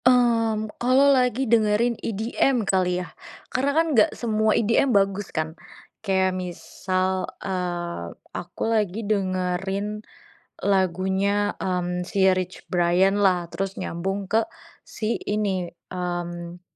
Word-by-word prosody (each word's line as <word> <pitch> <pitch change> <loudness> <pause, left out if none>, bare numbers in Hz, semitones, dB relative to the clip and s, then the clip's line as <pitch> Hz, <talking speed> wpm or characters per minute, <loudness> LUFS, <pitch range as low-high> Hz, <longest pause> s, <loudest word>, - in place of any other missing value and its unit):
Mmm, 230 -3 +3 0.2
kalo 265 +3 +5
lagi 255 0 +2
dengerin 225 0 +3
EDM 225 +3 0
kali 185 -2 +1
ya, - - -15 0.4
karena 270 +3 +1
kan 325 - +5
nggak 220 -5 +5
semua 220 -2 +1
EDM 230 +4 +3
bagus 195 0 0
kan. 155 0 -3 0.5
Kayak 190 -2 +1
misal, 185 +1 -2
eee, 175 - -3 0.2
aku 175 - -8
lagi 215 -1 0
dengerin 195 +1 -1 0.6
lagunya, 195 +2 +1
mmm, 180 -1 -2
si 190 +1 +3
Rich 185 -1 -2
Brian 180 +3 +3
lah, 180 -3 +2
terus 195 +1 -3
nyambung 195 +3 -3
ke 220 +1 +3 0.4
si 220 +1 -2
ini, 200 -3 0 0.2
mmm, 175 -1 -4
195 Hz, 115 wpm, -24 LUFS, 180-220 Hz, 0.6 s, kalo